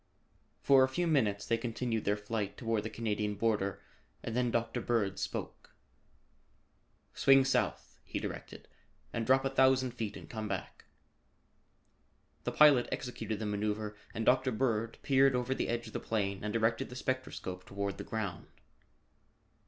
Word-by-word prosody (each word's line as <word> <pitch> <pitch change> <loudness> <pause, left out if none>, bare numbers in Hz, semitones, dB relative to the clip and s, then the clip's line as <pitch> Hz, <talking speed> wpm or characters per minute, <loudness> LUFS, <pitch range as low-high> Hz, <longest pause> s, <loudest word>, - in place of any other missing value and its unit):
For 135 -1 +6
a 130 - +2
few 175 +6 -1
minutes 115 -11 +1
they 115 +2 +1
continued 115 -1 -2
their 105 +1 +2
flight 105 -1 -3
toward 115 -3 0
the 110 - -5
Canadian 105 -2 -2
Border 100 -2 0 0.4
and 115 - -4
then 125 -1 +2
Dr. 115 -1 -1
Bird 100 -5 0
spoke. - - -5 1.4
"Swing 135 -1 +5
south," - - -1
he - - -5
directed, - - -7 0.5
"and 115 -1 -2
drop 135 +1 +4
a - - +2
thousand 130 -1 +4
feet 110 -4 -4
and - - -11
come 110 -2 -5
back." 95 -5 -5 1.6
The - - 0
pilot 145 -5 +6
executed 115 -3 -3
the 110 - -4
maneuver 105 +1 -2 0.2
and 115 - -3
Dr. 130 +1 +4
Bird 115 -1 0
peered 135 -1 +4
over 125 +1 0
the - - -2
edge 120 0 -1
of 110 - -10
the - - -2
plane 100 -3 -2
and 105 - -2
directed 115 +1 +1
the 125 - -9
spectroscope 125 -8 -3
toward 100 0 -4
the - - -4
ground. 100 -6 -4
115 Hz, 155 wpm, -32 LUFS, 105-125 Hz, 1.6 s, For